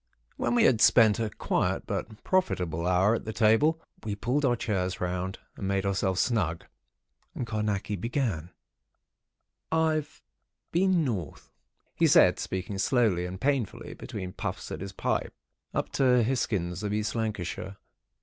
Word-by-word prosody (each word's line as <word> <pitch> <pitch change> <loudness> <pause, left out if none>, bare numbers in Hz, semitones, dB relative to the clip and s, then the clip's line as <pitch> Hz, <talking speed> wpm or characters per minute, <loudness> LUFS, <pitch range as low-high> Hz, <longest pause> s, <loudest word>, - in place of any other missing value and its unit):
When 120 - 0
we - - +5
had 120 -3 +4
spent 110 -3 +6
a 110 -2 0
quiet - - -1
but 110 -1 -5
profitable 90 - 0
hour 90 +4 +4
at 115 - -2
the 110 - -4
table, 115 +9 +3 0.2
we 105 -2 -3
pulled 125 +8 0
our 125 -3 +3
chairs 95 -5 -2
round, 90 +2 -2 0.2
and 95 - -4
made 100 0 0
ourselves 95 -2 0
snug; 90 -9 0 0.7
and 125 - -3
Carnacki 105 -2 -2
began:— 110 - -2 1.2
"I've 155 -1 0 0.5
been 180 -2 +3
North," 95 - -4 0.4
he - - +3
said, - - +6
speaking 95 +1 -4
slowly 100 -6 +2
and 95 +1 -7
painfully, 135 -5 -1
between 90 -1 -7
puffs - - -5
at - - -5
his 95 0 -5
pipe. - - -2 0.4
"Up - - -2
to 125 -3 +4
Hisgins 100 -7 -1
of 105 -1 -2
East 105 0 -1
Lancashire. 100 -3 -3
105 Hz, 145 wpm, -28 LUFS, 95-125 Hz, 1.2 s, spent